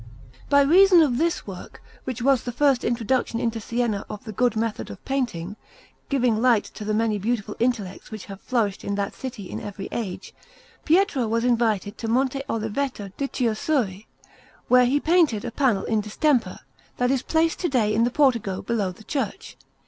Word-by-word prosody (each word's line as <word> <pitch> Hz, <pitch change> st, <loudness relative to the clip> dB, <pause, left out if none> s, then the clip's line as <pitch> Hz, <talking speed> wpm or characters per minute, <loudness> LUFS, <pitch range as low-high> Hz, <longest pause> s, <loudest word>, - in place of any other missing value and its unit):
By 285 Hz, 0 st, +6 dB
reason 360 Hz, +5 st, +6 dB
of 255 Hz, -4 st, 0 dB
this 335 Hz, +1 st, 0 dB
work, 190 Hz, -3 st, -9 dB, 0.3 s
which 255 Hz, -2 st, -4 dB
was 270 Hz, -2 st, +4 dB
the 245 Hz, -, -4 dB
first 270 Hz, 0 st, +2 dB
introduction 235 Hz, 0 st, 0 dB
into 230 Hz, -1 st, -2 dB
Siena 230 Hz, -2 st, -1 dB
of 210 Hz, +2 st, -7 dB
the 220 Hz, -, -7 dB
good 240 Hz, +3 st, +1 dB
method 225 Hz, 0 st, -2 dB
of -, -, -11 dB
painting, 215 Hz, -8 st, -2 dB, 0.5 s
giving 245 Hz, -5 st, +1 dB
light 235 Hz, -4 st, +4 dB
to -, -, -7 dB
the 210 Hz, 0 st, -1 dB
many 220 Hz, -1 st, +1 dB
beautiful 210 Hz, 0 st, -2 dB
intellects 225 Hz, -6 st, -2 dB
which 215 Hz, -3 st, -8 dB
have 195 Hz, -1 st, -10 dB
flourished 220 Hz, -6 st, -1 dB
in 200 Hz, -, -2 dB
that 200 Hz, 0 st, -2 dB
city 240 Hz, -7 st, -7 dB
in -, -, -5 dB
every 200 Hz, -1 st, -7 dB
age, 205 Hz, -6 st, -5 dB, 0.5 s
Pietro 320 Hz, -, +3 dB
was 230 Hz, +1 st, 0 dB
invited 225 Hz, -4 st, +1 dB
to 225 Hz, -, -4 dB
Monte 265 Hz, +3 st, +1 dB
Oliveto 225 Hz, -1 st, -3 dB
di 280 Hz, -, -2 dB
Chiusuri, 225 Hz, -4 st, -1 dB, 0.6 s
where 250 Hz, 0 st, +6 dB
he 280 Hz, +4 st, +2 dB
painted 315 Hz, -, +2 dB
a -, -, -4 dB
panel 240 Hz, -6 st, +1 dB
in 220 Hz, -2 st, +1 dB
distemper 240 Hz, +5 st, 0 dB, 0.4 s
that 245 Hz, +1 st, +1 dB
is 270 Hz, -2 st, +1 dB
placed 325 Hz, +2 st, +1 dB
to 350 Hz, -, 0 dB
day 225 Hz, -6 st, +2 dB
in 225 Hz, +2 st, +3 dB
the 240 Hz, -, +2 dB
portico 235 Hz, -9 st, +1 dB
below 210 Hz, -5 st, -1 dB
the 185 Hz, -, -15 dB
church. 275 Hz, +4 st, -4 dB
235 Hz, 180 wpm, -24 LUFS, 210-265 Hz, 0.6 s, By